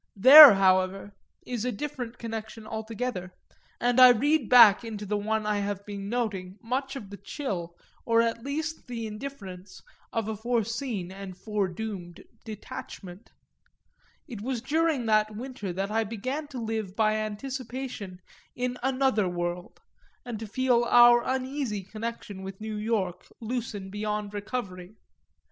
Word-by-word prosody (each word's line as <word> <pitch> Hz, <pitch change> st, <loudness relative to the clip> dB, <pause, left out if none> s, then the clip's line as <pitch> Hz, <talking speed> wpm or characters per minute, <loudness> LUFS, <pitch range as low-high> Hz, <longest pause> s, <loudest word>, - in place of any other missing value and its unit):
That, 270 Hz, +3 st, +11 dB
however, 190 Hz, +1 st, +2 dB, 0.3 s
is 245 Hz, -3 st, -4 dB
a 250 Hz, -, -1 dB
different 245 Hz, 0 st, -6 dB
connection 225 Hz, -1 st, -7 dB
altogether, 220 Hz, -3 st, -5 dB, 0.4 s
and 245 Hz, +1 st, +2 dB
I 255 Hz, 0 st, +10 dB
read 280 Hz, +2 st, +2 dB
back 235 Hz, -4 st, +8 dB
into 215 Hz, -2 st, -6 dB
the 210 Hz, +1 st, -2 dB
one 215 Hz, +1 st, -1 dB
I 210 Hz, -1 st, 0 dB
have 200 Hz, 0 st, -4 dB
been 200 Hz, -1 st, -6 dB
noting 205 Hz, -6 st, -3 dB
much 265 Hz, +4 st, -3 dB
of 210 Hz, -7 st, -8 dB
the 200 Hz, -, -8 dB
chill, 190 Hz, -, -5 dB, 0.3 s
or 230 Hz, 0 st, +2 dB
at 230 Hz, 0 st, 0 dB
least 315 Hz, +4 st, -4 dB
the 235 Hz, -2 st, -5 dB
indifference, 210 Hz, -5 st, -8 dB, 0.3 s
of 225 Hz, -2 st, -2 dB
a 220 Hz, -, -3 dB
foreseen 230 Hz, -3 st, -2 dB
and 190 Hz, -1 st, -9 dB
foredoomed 195 Hz, -3 st, -4 dB, 0.2 s
detachment: 205 Hz, -2 st, -9 dB, 1.0 s
it 230 Hz, -8 st, -8 dB
was 250 Hz, +2 st, -2 dB
during 300 Hz, 0 st, 0 dB
that 215 Hz, -1 st, +2 dB
winter 250 Hz, -4 st, -6 dB
that 195 Hz, +3 st, -3 dB
I 225 Hz, +1 st, +1 dB
began 255 Hz, +8 st, -4 dB
to 280 Hz, -3 st, -9 dB
live 220 Hz, -4 st, -4 dB
by 215 Hz, -1 st, +2 dB
anticipation 225 Hz, -3 st, -5 dB, 0.3 s
in 250 Hz, 0 st, -3 dB
another 260 Hz, -6 st, +1 dB
world 175 Hz, 0 st, -5 dB, 0.4 s
and 235 Hz, -3 st, -5 dB
to 225 Hz, -, -6 dB
feel 245 Hz, +2 st, +2 dB
our 240 Hz, 0 st, +7 dB
uneasy 260 Hz, -5 st, -2 dB
connection 215 Hz, -1 st, -7 dB
with 190 Hz, 0 st, -8 dB
New 220 Hz, 0 st, -5 dB
York 210 Hz, -5 st, -2 dB
loosen 220 Hz, -4 st, -5 dB
beyond 210 Hz, 0 st, -3 dB
recovery. 205 Hz, -3 st, -5 dB
220 Hz, 140 wpm, -27 LUFS, 200-245 Hz, 1.0 s, That